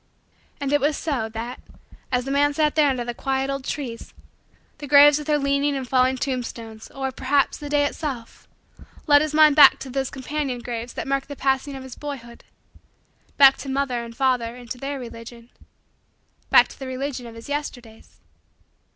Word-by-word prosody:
And 280 0 -2
it 290 - +3
was 295 +1 +1
so, 260 -8 -2
that, 230 +3 -6 0.5
as 250 -1 0
the 270 - -3
man 290 +1 +2
sat 305 -1 +2
there 300 -2 +4
under 250 -3 -2
the 240 - -4
quiet 270 +2 -2
old 275 -1 -4
trees, 260 -5 -6 0.6
the 290 - -7
graves 290 +1 +7
with 300 - -8
their 300 -1 +3
leaning 280 0 +1
and 260 -2 -5
fallen 260 +1 +2
tombstones, 235 -4 -5
or, 270 -1 -4
perhaps, 270 +2 +1
the 290 - -7
day 290 0 +2
itself, 275 -6 -5 0.6
led 290 -2 +6
his 305 0 -2
mind 305 -2 +6
back 290 -3 +8
to 265 - -8
those 270 0 -2
companion 270 -1 -3
graves 240 0 -6
that - - -5
marked 275 0 -1
the 285 - -7
passing 270 +1 -1
of 265 - -8
his 260 -2 -10
boyhood 255 -5 -8 0.9
back 270 -1 +7
to 270 - -6
father 265 -3 -1
and 230 0 -11
mother 250 -3 +1
and 245 -2 -12
to 250 - -5
their 275 +2 -4
religion 235 0 -10 1.0
back - - +6
to - - -14
the 265 - -6
religion 260 -1 -4
of 230 - -11
his 230 - -11
Yesterdays. 250 -6 -7
270 Hz, 185 wpm, -23 LUFS, 245-285 Hz, 1.0 s, back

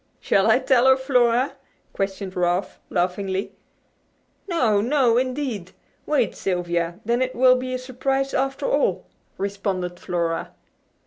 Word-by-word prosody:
"Shall - - +2
I - - +6
tell 260 -1 +3
her, 265 0 +6
Flora?" 255 -1 +2 0.4
questioned 195 -1 -3
Ralph, 180 +1 0
laughingly. 190 +2 -1 1.0
"No! 240 - +2
No, 245 -1 +3
indeed! 255 -8 -3 0.3
Wait, 260 -9 +1
Sylvia, 175 -2 -2
then 235 +2 +1
it 255 0 -1
will 255 +1 +6
be 255 0 -3
a - - -1
surprise 270 +2 -2
after 270 +1 -1
all," - - +1 0.3
responded 195 -3 -3
Flora. 170 -1 -2
235 Hz, 125 wpm, -23 LUFS, 185-260 Hz, 1.0 s, I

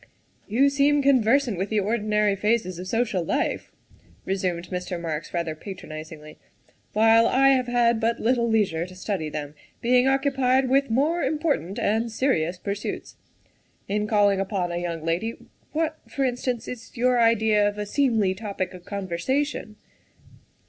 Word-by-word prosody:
" - - -38
You 280 +2 +6
seem 280 +1 +2
conversant 255 -4 +3
with 195 - -2
the 215 - +1
ordinary 210 -1 +1
phases 200 -3 0
of 185 - -6
social 220 -5 0
life," - - -2 0.5
resumed 180 -2 -2
Mr. 180 -1 -4
Marks 160 -2 -4
rather 170 -2 -2
patronizingly, 155 -3 -9 0.3
" - - -36
while 225 +2 +5
I 270 +1 +4
have 255 -2 +3
had 235 -1 +2
but 230 +1 0
little 235 0 +1
leisure 190 -7 +1
to 185 - -13
study 185 -4 -3
them, 150 -1 -5 0.3
being 250 +2 +3
occupied 270 -1 +2
with 275 0 +3
more 295 +9 +1
important 285 - -1
and 225 +2 0
serious 185 - 0
pur 200 +2 -3
suits. 205 - -6 0.7
In 210 +1 -1
calling 205 -2 +3
upon 195 -3 -2
a 170 - -2
young 170 -2 -4
lady 180 +8 -1 0.4
what, 315 0 -1
for 275 - -2
instance, 245 -1 -2
is 240 -1 -9
your 250 +1 +3
idea 220 -2 +3
of 205 0 -3
a 210 - -3
seemly 220 -5 +1
topic 190 -2 -4
of 180 -1 -12
conversation?" 210 - -2
215 Hz, 155 wpm, -25 LUFS, 185-250 Hz, 0.7 s, You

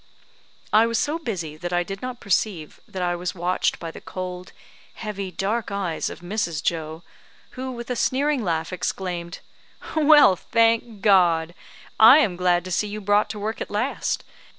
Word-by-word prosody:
I 220 +2 +6
was 230 0 0
so 300 +6 -1
busy 175 - -5
that 175 +2 -5
I 175 0 +1
did 195 +2 -7
not 255 -1 -5
perceive 190 -5 -1
that 185 -1 -4
I 175 0 0
was 180 +1 -4
watched 180 +1 0
by 165 -1 -6
the - - -11
cold, 180 -1 -6 0.4
heavy, 200 -3 -5
dark 210 +5 -2
eyes 195 -5 -2
of - - -10
Mrs. 175 -4 -2
Joe, 160 0 -2 0.5
who, 260 +1 -6
with 240 -1 -7
a - - 0
sneering 275 +2 +1
laugh, 165 -1 -2
exclaimed 180 -1 -4 0.5
"Well, 300 -9 +7
thank 230 +1 +1
God! 175 -5 +4 0.5
I 225 +6 +10
am 215 -13 +2
glad 175 0 +1
to 185 - -6
see 210 +4 0
you 210 +1 -5
brought 205 +1 +2
to 210 0 -6
work 215 +2 -4
at - - -4
last. 245 +7 -2
195 Hz, 175 wpm, -23 LUFS, 175-225 Hz, 0.5 s, I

